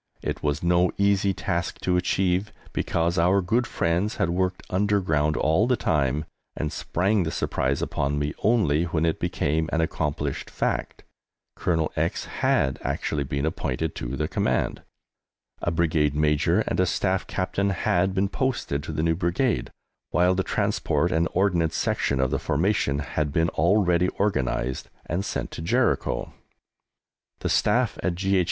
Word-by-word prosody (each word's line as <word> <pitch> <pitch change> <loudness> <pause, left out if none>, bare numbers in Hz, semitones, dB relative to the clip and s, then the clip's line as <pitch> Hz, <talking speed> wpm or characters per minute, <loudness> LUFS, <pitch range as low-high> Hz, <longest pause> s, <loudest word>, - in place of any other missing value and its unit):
It - - -3
was 75 +1 -1
no 90 +1 +3
easy 100 0 +3
task 90 -2 -2
to 90 - +1
achieve, 95 +2 +1 0.2
because 85 +1 0
our 90 +4 +4
good 115 +7 +1
friends 90 +1 0
had 85 - 0
worked 90 +1 -1
underground 90 -7 +1
all 80 +9 +2
the 125 - +3
time, 75 - 0 0.3
and 75 - -2
sprang 95 +4 0
this 80 -2 -2
surprise 65 +1 0
upon 70 +1 -1
me 75 0 -1
only 85 -9 +3
when 80 -1 0
it 80 - 0
became 80 +2 0
an 80 - +1
accomplished 75 -3 -2
fact; - - -2 0.5
Colonel 80 -3 0
X - - -1
had 65 - 0
actually 75 -2 -2
been 70 +2 -2
appointed 80 0 -2
to - - -4
the - - -1
command, - - 0 0.8
a - - 0
Brigade 80 -3 +1
Major 75 +5 +2
and - - -2
a 95 - +3
Staff 95 +2 0
Captain 100 +1 -1
had 95 0 +1
been 95 +1 +2
posted 120 - -1
to 75 - -6
the 75 0 -2
new 80 0 +3
Brigade, 85 - 0 0.4
while 90 +1 +3
the 95 - +1
transport - - 0
and 80 +1 +2
ordnance 85 -4 +2
section 70 - 0
of 65 -1 +1
the - - 0
formation 80 -2 +1
had 75 0 -2
been 80 +2 +2
already 90 +1 +3
organized 65 -11 -1 0.2
and 85 +4 -2
sent - - -3
to - - -6
Jericho. 80 -6 0 1.1
The - - -1
Staff - - +2
at 90 -2 0
G. 95 +1 +1
85 Hz, 155 wpm, -25 LUFS, 75-95 Hz, 1.1 s, our